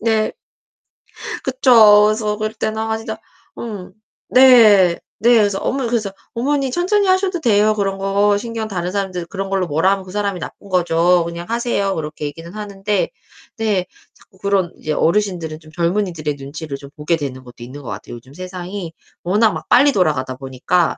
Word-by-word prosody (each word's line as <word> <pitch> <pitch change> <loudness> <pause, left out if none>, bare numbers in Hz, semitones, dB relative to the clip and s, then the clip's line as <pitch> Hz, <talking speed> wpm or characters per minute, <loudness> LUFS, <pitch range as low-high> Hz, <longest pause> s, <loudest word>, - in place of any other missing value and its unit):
네. 220 -1 +1 1.1
그쵸. 230 -6 +6
그래서 215 -1 0
그럴 215 0 -3
때는 220 -1 -3
아 220 0 -1
진짜 220 0 -6 0.4
음. 205 -6 -7 0.4
네. 220 -9 +6 0.2
네. 240 +2 +5
그래서 205 -3 +2
어머니 260 -3 -1
그래서 215 -4 -1 0.2
"어머니 270 +2 0
천천히 385 +7 +1
하셔도 375 -2 +1
돼요. 215 -4 +3
그런 195 -2 -1
거 200 +1 +2
신경 225 0 -4
다른 180 -3 -3
사람들 190 -3 -3
그런 195 +3 -5
걸로 190 -2 0
뭐라 165 +6 +2
하면 195 -1 -2
그 185 - -11
사람이 200 -2 -2
나쁜 200 - -9
거죠. 175 -1 +3
그냥 170 +1 -6
하세요." 230 -4 0
그렇게 155 -1 -5
얘기는 165 +4 -7
하는데 205 -1 -2 0.5
근데 210 -5 0 0.3
자꾸 190 - -24
그런 195 -3 0
이제 155 - -3
어르신들은 170 -3 0
좀 155 -1 -17
젊은이들의 170 -4 -1
눈치를 140 +1 -7
좀 140 0 -12
보게 150 +3 0
되는 130 -4 -6
것도 120 -1 -12
있는 130 +4 -9
것 125 - -8
같아요. - - -7
요즘 125 +3 -14
세상이 185 0 -7 0.3
워낙 210 +4 +3
막 - - -7
빨리 280 +3 +5
돌아가다 150 - 0
보니까 135 +6 0
195 Hz, 365 characters per minute, -19 LUFS, 170-220 Hz, 1.1 s, 그쵸